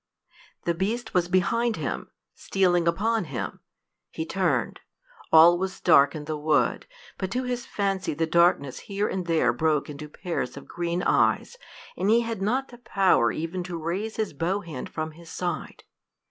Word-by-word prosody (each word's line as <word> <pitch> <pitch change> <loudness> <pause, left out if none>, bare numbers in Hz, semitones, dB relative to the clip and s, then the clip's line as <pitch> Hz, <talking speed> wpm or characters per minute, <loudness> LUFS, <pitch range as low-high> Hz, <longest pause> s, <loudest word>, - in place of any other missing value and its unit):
The 170 - +1
beast 220 +7 -2
was 180 -1 +2
behind 230 +6 +1
him - - -4 0.2
stealing 175 -3 +1
upon 215 +4 +1
him! 130 -8 -5 0.5
He 160 - -4
turned. 190 +2 0 0.5
All 170 +2 +8
was 190 0 -3
dark 140 -4 +5
in 150 -1 -6
the 155 -1 -3
wood, 150 0 +1 0.3
but 190 - -2
to 255 +1 -1
his 245 -1 -3
fancy 195 -5 -1
the 165 +2 +1
darkness 160 -5 +2
here 200 +1 0
and 185 -2 -3
there 155 -8 +3
broke 150 +2 0
into 150 +1 -8
pairs 175 +3 -4
of - - -10
green 175 +1 -2
eyes, - - +2 0.4
and 190 +3 0
he 230 +2 +5
had 230 -4 -4
not 255 +7 0
the 240 - -13
power 195 - +3
even 165 +3 -3
to 175 -1 -5
raise 185 +7 -3
his 215 -7 -2
bow 175 +7 -1
hand 160 -9 -7
from 155 0 -4
his 165 +1 -14
side. 175 +1 -4
175 Hz, 170 wpm, -26 LUFS, 160-200 Hz, 0.5 s, All